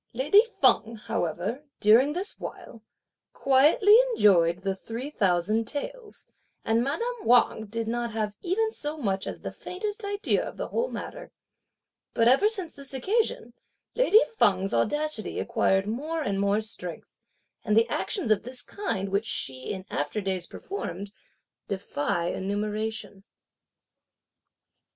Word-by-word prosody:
Lady 295 - +5 0.2
Feng, 225 +1 +3
however, 200 - -3 0.2
during 235 +7 +5
this 370 +5 -3
while, 230 - -9 0.5
quietly 305 - +5 0.2
enjoyed 175 - +4
the 195 -1 0
three 235 +8 -6
thousand 200 - +1
taels, 455 - -4 0.4
and 225 +1 +2
madame 460 - -3
Wang 235 -2 +3
did 225 +2 -3
not 240 +1 -1
have 215 -2 -3
even 435 +5 0
so 300 -6 -4
much 195 -8 -2
as - - -6
the - - -5
faintest 415 +4 -5
idea 405 +1 +1
of - - -8
the - - -4
whole 480 +2 -1
matter. - - -7 0.9
But 230 - +4
ever 270 - +5
since 385 -7 -2
this 275 -1 -8
occasion, 375 - 0 0.4
lady - - +6 0.2
Feng's 195 -2 +3
audacity 295 - 0
acquired 195 0 +1
more 300 +9 -3
and 200 -5 -1
more 200 +2 +2
strength; 180 -6 -5 0.5
and 215 -1 +1
the 225 - +5
actions 355 - -1
of 210 - +3
this 250 +2 -4
kind, 200 - -3
which 200 +3 0
she, 130 -10 -3
in 185 -2 -6
after 145 +8 -2
days, 190 -3 -2
performed, 205 - -6 0.6
defy 170 -4 -2
enumeration. 210 0 -3
230 Hz, 135 wpm, -27 LUFS, 200-315 Hz, 0.9 s, lady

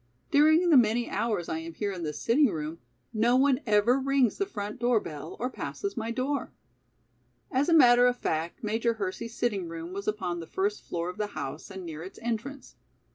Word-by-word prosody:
During 315 +4 +5
the 295 - +8
many 235 0 +3
hours 210 -7 -1
I 160 - -2
am 165 0 -8
here 205 -1 -2
in 185 -2 -6
this 150 -3 -4
sitting 265 - +4
room, 155 -2 -4 0.3
no 230 +3 +3
one 265 0 +4
ever 215 +5 +4
rings 270 -3 +2
the 395 - 0
front 210 - -5
door 240 -1 +3
bell 150 -7 -8
or 245 - 0
passes 395 +9 -5
my 225 -2 -3
door." 260 +4 -2 1.0
As 280 +3 +1
a - - +4
matter 245 -4 +7
of 245 0 +1
fact 165 +5 -3
Major 225 +2 0
Hersey's 220 +3 -5
sitting 205 -7 -1
room 165 +1 -7
was 200 +1 -6
upon 185 -5 -2
the 165 - -8
first 405 +2 -1
floor 170 0 -3
of 180 - -16
the 210 - 0
house 135 +3 -5
and 190 -2 -8
near 160 -2 -7
its 185 +3 -9
entrance. 240 +4 -4
225 Hz, 200 wpm, -28 LUFS, 180-255 Hz, 1.0 s, the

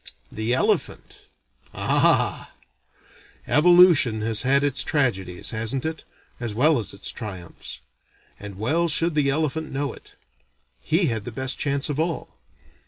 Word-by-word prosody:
The 110 +2 -3
elephant? - - -2 0.5
Ah! - - +1 0.9
Evolution 165 -8 +5
has 110 -1 +2
had 140 +2 +2
its 145 -1 +1
tragedies, 95 - 0
hasn't 115 +4 -2
it, 160 0 -5 0.3
as 115 -4 -4
well 145 +3 +3
as 110 - -4
its 100 - -4
triumphs; 95 -7 -8 0.6
and 100 -2 -9
well 155 +11 0
should 165 +1 +2
the 145 -2 +1
elephant 155 +2 -2
know 140 -1 -3
it. - - -17 0.7
He - - +1
had 110 -3 -3
the 120 - -7
best 130 +3 -1
chance 140 -1 0
of 145 -1 -3
all. 165 -3 -3
135 Hz, 135 wpm, -23 LUFS, 110-155 Hz, 0.9 s, Evolution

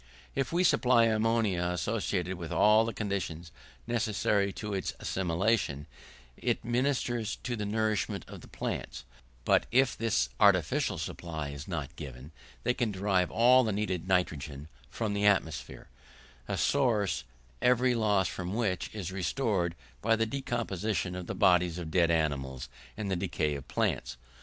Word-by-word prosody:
If 135 -2 -1
we 175 +2 +2
supply 125 -8 +4
ammonia 110 -4 +1
associated 90 0 -1
with 85 -3 -7
all 110 +2 +5
the 115 - -2
conditions 90 -6 -4 0.3
necessary 105 -4 +1
to 105 +1 -5
its 95 - -2
assimilation, 90 -4 0 0.5
it - - -1
ministers 120 -3 0
to 120 0 -2
the 105 -2 -3
nourishment 110 -1 -1
of - - -10
the - - -13
plants; - - -5 0.4
but - - +3
if 130 +1 +3
this 105 - +1
artificial - - +3
supply 80 -4 -5
is 70 +1 -8
not 80 -7 -4
given 70 0 -8 0.3
they 125 - +2
can 120 -3 -1
derive 95 -2 +1
all 125 +3 +5
the 110 - 0
needed 95 -4 -2
nitrogen 75 -5 -1 0.2
from 110 -3 -2
the 100 0 +2
atmosphere 80 -9 0 0.6
a - - -2
source, 115 -10 +1 0.4
every 125 0 +4
loss 105 -5 +2
from 90 +2 -4
which 100 -6 -1
is 95 -4 -4
restored 95 -3 0 0.3
by 115 +1 +3
the 115 0 +1
decomposition 110 -7 -2
of 90 -1 -6
the - - -4
bodies 90 -1 +3
of 85 -3 -5
dead 85 -1 +3
animals 70 -5 -1 0.3
and 105 -2 -3
the - - +2
decay 75 -3 -1
of 70 -2 -7
plants. - - -1
100 Hz, 150 wpm, -30 LUFS, 85-115 Hz, 0.6 s, all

